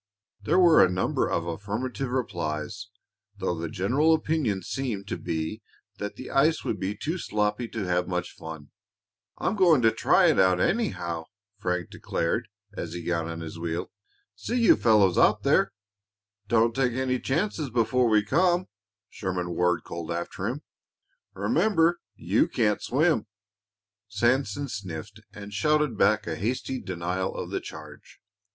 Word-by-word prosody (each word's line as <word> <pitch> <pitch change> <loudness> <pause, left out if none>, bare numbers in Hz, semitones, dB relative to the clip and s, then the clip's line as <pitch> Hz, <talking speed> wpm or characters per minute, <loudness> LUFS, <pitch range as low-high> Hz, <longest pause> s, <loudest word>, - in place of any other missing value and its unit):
There 110 - +1
were 175 -3 +7
a 95 - +4
number 90 +1 0
of 85 -1 -1
affirmative 105 +9 -3
replies, 95 -5 -3 0.5
though 95 -3 -1
the 85 -1 -4
general 135 - +2
opinion 150 - -1
seemed 110 -4 -3
to - - -1
be 80 +7 -4 0.4
that 105 0 -4
the 130 - -8
ice 155 +4 +3
would - - -2
be 100 +2 -3
too 160 - -3
sloppy 105 -1 -1
to 110 -2 -4
have 90 0 0
much 90 -1 -2
fun. 80 -3 -10 0.7
"I'm 200 - -1
going 170 - +5
to 115 - +6
try - - +3
it, - - +1
anyhow," 90 - +1 0.3
Frank 90 -4 -2
declared, 110 +8 -2 0.3
as 85 -5 -5
he 90 -1 -5
got 85 -1 -1
on 85 0 -5
his 80 0 -7
wheel. 85 +1 -3 0.4
"See 245 +2 -2
you 230 - +6
fellows 105 -6 +4
out - - +4
there." - - +3 0.8
"Don't 115 +1 +3
take 125 -1 +1
any 130 0 0
chances 160 +1 -1
before 120 +1 +2
we 105 -1 +4
come," 175 - +2 0.4
Sherman 90 -3 -3
Ward 90 0 +1
called 85 -1 -7
after 85 0 -3
him. - - -4 0.7
"Remember 165 - +2 0.2
you - - +2
can't 105 -3 +1
swim." 150 -2 +1 0.8
Sanson 120 +5 0
sniffed 100 - -7
and 105 0 -10
shouted 150 +4 +2
back 105 +1 +3
a 85 - -3
hasty 125 +5 -2
denial 90 +1 -3
of - - -5
the - - -2
charge. - - -11
105 Hz, 150 wpm, -26 LUFS, 90-130 Hz, 0.8 s, were